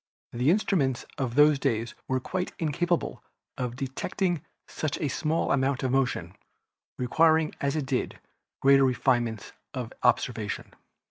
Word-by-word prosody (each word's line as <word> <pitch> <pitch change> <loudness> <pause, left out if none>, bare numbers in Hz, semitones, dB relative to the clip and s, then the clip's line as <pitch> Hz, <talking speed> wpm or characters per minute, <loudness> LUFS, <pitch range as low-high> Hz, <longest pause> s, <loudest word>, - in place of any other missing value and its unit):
The 125 +4 +2
instruments 165 - +1
of 125 -3 -2
those 150 0 +6
days 120 -4 -1
were 130 0 +1
quite 180 +7 -3
incapable 170 +2 -1 0.3
of 125 -2 -3
detecting 150 +6 -2 0.3
such 155 -2 -3
a 150 - 0
small 160 +4 0
amount 135 -1 +1
of 130 - +1
motion, 135 -1 0 0.6
requiring 160 +5 +3
as 140 +1 0
it 150 -3 -1
did 130 -2 -2 0.4
greater 135 0 +6
refine 125 -1 +2
ments 110 -3 -7 0.2
of - - -4
observation. - - 0
135 Hz, 135 wpm, -27 LUFS, 125-160 Hz, 0.6 s, those